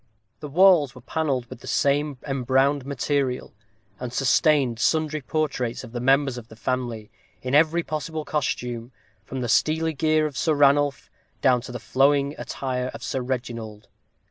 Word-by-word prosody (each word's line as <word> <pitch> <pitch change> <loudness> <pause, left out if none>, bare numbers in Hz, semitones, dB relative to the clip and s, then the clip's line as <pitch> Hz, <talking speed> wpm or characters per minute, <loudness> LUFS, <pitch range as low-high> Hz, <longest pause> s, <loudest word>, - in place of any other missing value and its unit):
The 150 - -7
walls 165 -5 +5
were 125 - -12
panelled 135 -2 -1
with 115 - -11
the - - -12
same 145 0 +1
embrowned 135 +1 +1
material, 140 -1 -1 0.5
and 125 -1 -5
sustained 135 -2 +2
sundry 155 +2 +1
portraits 130 -5 -2
of 125 - -10
the 120 - -4
members 135 0 +2
of 115 - -13
the 110 - -13
family, 120 -2 -3 0.3
in 130 +1 -3
every 160 +3 +4
possible 155 0 -4
costume, 125 -4 -3 0.3
from 130 0 -6
the 120 - -2
steely 160 +6 +2
gear 155 +1 +2
of 150 -3 -4
Sir 155 +2 +1
Ranulph, 145 -1 +2 0.3
down 125 -3 +4
to 125 - -9
the 125 - -4
flowing 140 +1 +2
attire 130 -1 -3
of - - -9
Sir 130 - -2
Reginald. 120 -4 -5
135 Hz, 160 wpm, -24 LUFS, 125-150 Hz, 0.5 s, walls